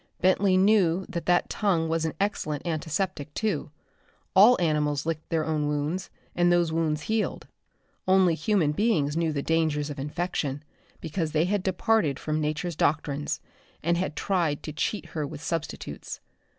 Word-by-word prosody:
Bentley 185 +1 +3
knew 190 -3 +3
that 175 -3 -5
that 175 0 +3
tongue 180 -6 +1
was 165 0 0
an 160 - -3
excellent 160 -7 -2
antiseptic, 160 -1 -2
too. 210 -11 -1 0.7
All 215 +5 +7
animals 150 -4 +1
licked 160 -1 -3
their 160 -2 0
own 155 -2 0
wounds, 150 +5 -2 0.3
and 175 0 +3
those 175 -2 +3
wounds 155 -2 0
healed. 220 -1 -1 0.6
Only 185 -2 +5
human 160 0 +1
beings 155 -6 +1
knew 165 -1 +1
the 140 -2 -2
dangers 155 -2 +1
of 140 - -7
infection, 150 -1 -2 0.4
because 160 -1 -3
they 155 +2 +3
had 200 +2 0
departed 190 -5 +1
from 155 0 -2
Nature's 155 +3 -2
doctrines 145 -1 0 0.4
and 170 +2 +2
had 175 -3 -2
tried 170 -5 0
to 155 - -6
cheat 200 +7 -2
her 150 -3 -3
with - - -8
substitutes. 165 -2 -4
165 Hz, 155 wpm, -27 LUFS, 150-185 Hz, 0.7 s, All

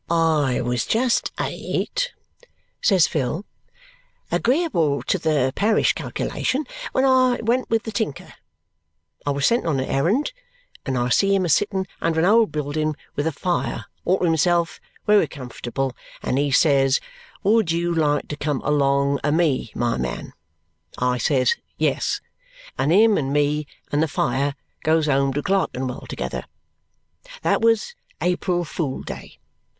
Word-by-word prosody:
"I 160 -6 +2
was 125 -1 -1
just 240 +2 +1
eight," - - -2 0.7
says 190 - +5
Phil, 150 +7 -2 0.9
"agreeable 175 - +1
to 190 - 0
the 150 -5 +1
parish 215 +2 +3
calculation, 280 +4 -2 0.3
when 260 - +2
I 255 -2 +4
went 245 +3 +1
with 225 0 +1
the 220 - -5
tinker. 205 -9 -3 0.9
I - - +3
was 140 0 +1
sent 235 -6 +2
on 145 -5 +1
a - - 0
errand, 180 - 0 0.5
and 130 -1 0
I 120 0 0
see 195 +9 +3
him 190 -2 +1
a - - -1
sittin 190 +4 +1 0.2
under 165 -1 +1
a - - +3
old 225 +1 +4
buildin 155 +1 -1 0.2
with 145 +2 0
a - - +1
fire 175 +4 -2 0.2
all 185 - +2
to - - -4
himself 170 +1 +2 0.3
wery 210 0 +4
comfortable, 130 -1 -4 0.3
and 130 - 0
he 145 0 +1
says, 135 -1 +4 0.4
'Would 210 -3 +3
you 170 +1 0
like 150 -3 +1
to 150 - -3
come 145 -2 -1
along 140 -1 +2
a 150 - +2
me, 150 -8 +1
my 120 0 0
man?' 60 -1 -4 0.6
I 125 0 +1
says 470 - +3 0.2
'Yes,' - - 0 0.5
and 145 - +1
him 215 +3 +5
and 135 -2 -2
me 145 +1 +1 0.2
and 145 - +2
the 160 - +2
fire 140 0 0 0.3
goes 160 0 +3
home 140 -2 +2
to 145 - -2
Clerkenwell 130 -10 -1
together. - - -4 1.0
That - - +2
was 230 - +2 0.3
April 180 0 0
Fool 150 -4 -3
Day. - - -8
155 Hz, 150 wpm, -22 LUFS, 140-195 Hz, 1.0 s, says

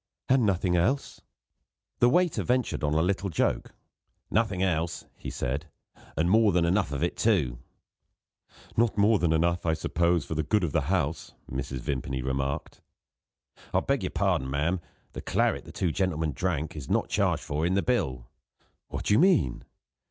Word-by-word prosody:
"And 130 -4 +4
nothing 90 -2 +1
else?" 120 +12 0 0.8
The 120 - +5
waiter 175 +4 +2
ventured 125 -8 0
on 75 0 +1
a 80 - +3
little 100 +2 0
joke. 80 - -1 0.6
"Nothing 105 -4 +1
else," 85 -2 -1
he - - -7
said 70 +6 -3 0.5
"and 80 +3 +2
more 110 +2 +5
than 85 -1 +2
enough 90 -3 +1
of 70 +2 -2
it, 85 - 0
too." 75 - +1 1.2
"Not 115 -1 +2
more 105 +1 +4
than 85 -2 +2
enough, 85 +2 +1
I 80 -1 +1
suppose, 85 0 +1
for - - -4
the 80 - 0
good 105 +6 +1
of 85 - 0
the 75 -1 0
house," 80 -4 -1 0.2
Mrs. 65 0 -4
Vimpany 65 -2 -3
remarked. 70 +1 -3 0.9
"I - - +6
beg - - 0
your - - -2
pardon, 65 - 0
ma'am; 80 +6 0 0.3
the - - -6
claret - - 0
the - - -10
two 90 - -1
gentlemen 80 -4 0
drank 80 -3 -2
is 75 -4 -7
not - - +1
charged - - +1
for 75 +2 -2
in 90 +3 +1
the 100 - +2
bill." 65 - -1 0.6
"What - - -5
do - - +3
you 105 - +5
mean?" 170 - +3
85 Hz, 175 wpm, -27 LUFS, 75-100 Hz, 1.2 s, I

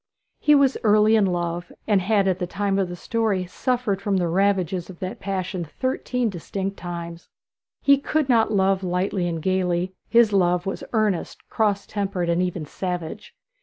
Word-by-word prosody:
He 295 - +5
was 275 -2 +3
early 215 0 +5
in 210 -3 +4
love, 175 -1 -2
and 205 -3 +3
had 200 0 +2
at 185 -1 +1
the 180 - -2
time 195 +1 -1
of 190 -2 0
the 175 - -5
story 210 -1 -1
suffered 215 +1 -1
from 200 -1 0
the 175 -2 +1
ravages 185 -1 +1
of 185 - -10
that 185 +1 -5
passion 190 -2 -3
thirteen 250 - -2
distinct 195 +1 -4
times. 170 -1 -7 0.5
He 280 -1 +5
could 305 0 0
not 230 -4 +3
love 195 -1 +2
lightly 180 0 -1
and 165 -1 -2
gaily; 185 +1 0 0.2
his 230 -3 +5
love 180 -2 +2
was 195 - -4
earnest, 215 -6 -1
cross 205 -2 +1
tempered, 195 -4 -2
and 170 +1 +2
even 180 -3 -2
savage. 175 0 -5
190 Hz, 170 wpm, -23 LUFS, 180-210 Hz, 0.5 s, He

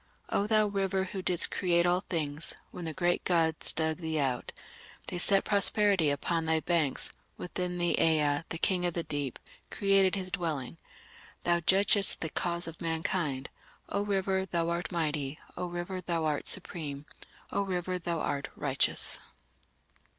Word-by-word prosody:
O 200 - +1
thou 215 -1 +4
River 195 -1 0
who 190 0 -5
didst 180 -2 +1
create 175 -2 +2
all 175 +1 +3
things, 155 -5 -3 0.2
When 175 - -7
the 160 - -2
great 175 0 +1
gods 165 -3 +2
dug 160 0 0
thee 160 -2 -2
out, 130 -4 0 0.5
They 180 - -4
set 195 +2 +4
prosperity 200 -4 +3
upon 160 +3 0
thy 160 0 +3
banks, 155 -3 +1 0.3
Within 180 0 -3
thee 175 -1 +2
Ea, 150 -2 +4
the 165 - -3
King 180 -1 +1
of 175 - -3
the 170 - -1
Deep, 145 -5 -3 0.3
created 195 -2 +3
his 185 -1 -4
dwelling... 160 -5 -2 0.7
Thou 175 0 +3
judgest 195 +3 +3
the 160 - 0
cause 170 +2 -1
of 165 -1 -8
mankind! 160 -4 -1 0.4
O 200 - 0
River, 195 -2 0
thou 170 -3 -1
art 170 0 -2
mighty! 150 -4 -1 0.2
O 180 - -3
River, 175 +2 -4
thou 170 -2 -1
art 150 -2 -1
supreme! 145 -4 -2 0.5
O 200 - +1
River, 185 -1 -2
thou 170 -1 -2
art 140 -1 -2
righteous! 140 -2 0
170 Hz, 160 wpm, -30 LUFS, 160-185 Hz, 0.7 s, thou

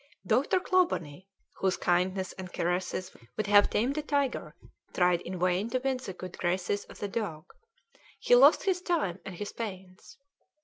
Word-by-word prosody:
Dr. 290 +8 +2
Clawbonny, 190 - 0 0.3
whose 190 -1 0
kindness 185 +1 0
and 185 -2 -8
caresses 180 +1 -2 0.2
would 215 - 0
have 205 0 +5
tamed 265 +8 0
a - - -1
tiger, 285 -3 -1 0.4
tried 180 -1 +3
in 185 +1 -6
vain 180 +4 +1
to 255 - 0
win 265 0 -1
the 250 -7 -7
good 185 0 -9
graces 185 +3 -1
of - - -13
the 205 - -3
dog; 195 -7 -4 0.7
he - - +2
lost - - +7
his 370 -2 0
time 310 - -1
and 190 - -6
his 205 +3 -5
pains. 190 -4 -8
195 Hz, 165 wpm, -29 LUFS, 180-255 Hz, 0.7 s, lost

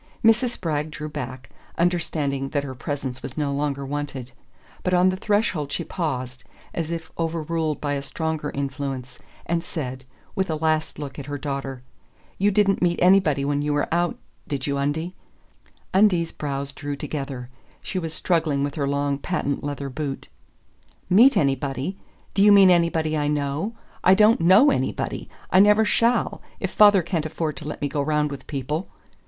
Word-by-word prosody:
Mrs. 230 +3 +5
Spragg 155 -3 -2
drew 155 0 -6
back, 130 -2 -7 0.3
understanding 155 -6 0
that 145 -1 -1
her 135 -2 -5
presence 130 0 -4
was - - -8
no 145 -2 0
longer 140 -1 -2
wanted. 135 -3 -4 0.5
But 180 0 +1
on 180 +1 +5
the 185 - 0
threshold 190 -7 0
she - - -2
paused, 130 -7 -4 0.3
as 165 -2 -3
if 165 -1 -5
overruled 165 -1 -1
by 145 -1 -1
a 140 - -2
stronger 160 +1 -3
influence, 135 -2 -4 0.3
and 170 0 -1
said, 130 -6 -5 0.3
with 190 -1 -1
a 160 - 0
last 155 0 0
look 145 -1 -6
at 140 - -7
her 145 0 -3
daughter: 135 -2 -4 0.6
"You 200 +2 +4
didn't 200 -1 +2
meet 175 -1 +2
anybody 180 -7 +4
when 145 0 0
you 150 0 0
were 145 - +1
out, 175 0 +1 0.3
did 140 -1 -3
you, 140 -2 -1
Undie?" 160 +5 -1 0.8
Undine's 185 -4 +4
brows 140 -1 -4
drew 145 0 -4
together: 135 -4 -5 0.3
she 185 - -3
was 165 -2 -4
struggling 160 -4 +1
with 145 0 -2
her 140 -2 -1
long 140 0 0
patent 140 -4 -2
leather 145 -1 -4
boot. 135 0 -5 0.8
"Meet 245 +9 +7
anybody? 135 +4 0 0.4
Do 195 - +2
you 205 +1 +7
mean 195 -2 +8
anybody 165 -2 +2
I 145 -1 0
know? 150 +8 -1 0.3
I 185 - +7
don't 215 -1 +5
KNOW 195 - +7
anybody - - -2 0.2
I 185 - +6
never 210 +2 +6
shall, 235 +3 +1 0.2
if - - -2
father 205 -3 +6
can't 165 -2 -1
afford 155 -1 -3
to 145 - -7
let 150 - -5
me - - +2
go 145 +1 -2
round 150 0 +1
with 140 - -8
people!" 150 +5 -3
150 Hz, 170 wpm, -24 LUFS, 140-175 Hz, 0.8 s, mean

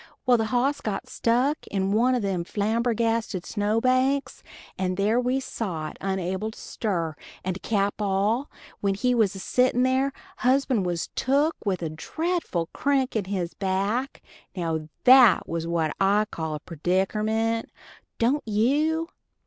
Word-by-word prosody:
Well, 250 -1 +5
the 225 - 0
hoss 255 +5 0
got 200 -3 -3
stuck 250 +6 0
in 195 -1 -1
one 245 +5 +3
o' - - +1
them 195 -5 -1
are - - -7
flambergasted 225 -1 0
snow 210 +1 0
banks, 255 +3 +1 0.3
and 185 -1 -2
there 210 +4 +2
we 250 +2 +1
sot, 175 -12 -4
onable 190 +2 -2
to - - -16
stir, 170 -8 -2 0.3
and 185 0 -2
to - - -15
cap 205 -1 -1
all, 205 +7 +1 0.3
while 195 -1 0
we 250 0 +4
was 220 -5 +2
a - - -6
sittin' 250 +4 +2
there, 260 +2 +2 0.3
husband 255 - +2
was 175 -1 -2
took 285 +5 +2
with 185 -3 0
a 160 - -1
dretful 315 - -2
crik 275 -3 0
in 210 -4 0
his 185 -3 -3
back. 200 +7 -1 0.3
Now 160 -3 -2
that 250 -4 +7
was 165 0 -3
what 165 -2 0
I 205 +2 +4
call 160 -2 -3
a - - -5
perdickerment, 215 +7 0 0.5
don't 260 +6 +2
you? 295 +10 +1
215 Hz, 155 wpm, -25 LUFS, 190-255 Hz, 0.5 s, that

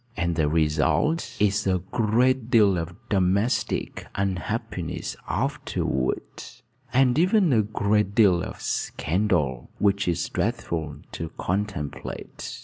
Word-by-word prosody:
And 85 -2 0
the 75 -2 +2
result 80 - +1
is 105 0 +2
a 95 -1 +3
great 120 +2 +2
deal 105 -5 +5
of 85 0 -4
domestic 100 +3 0
unhappiness 95 -2 -3
afterward 65 -1 -1 0.7
and 130 +1 +4
even 185 - +4
a 110 - +5
great 105 -1 0
deal 95 -6 +5
of - - -6
scandal, 80 - -1
which 100 -1 +2
is 85 -3 0
dreadful 80 -3 -2 0.2
to 80 - -5
contemplate. 95 -6 -4
100 Hz, 110 wpm, -25 LUFS, 85-110 Hz, 0.7 s, deal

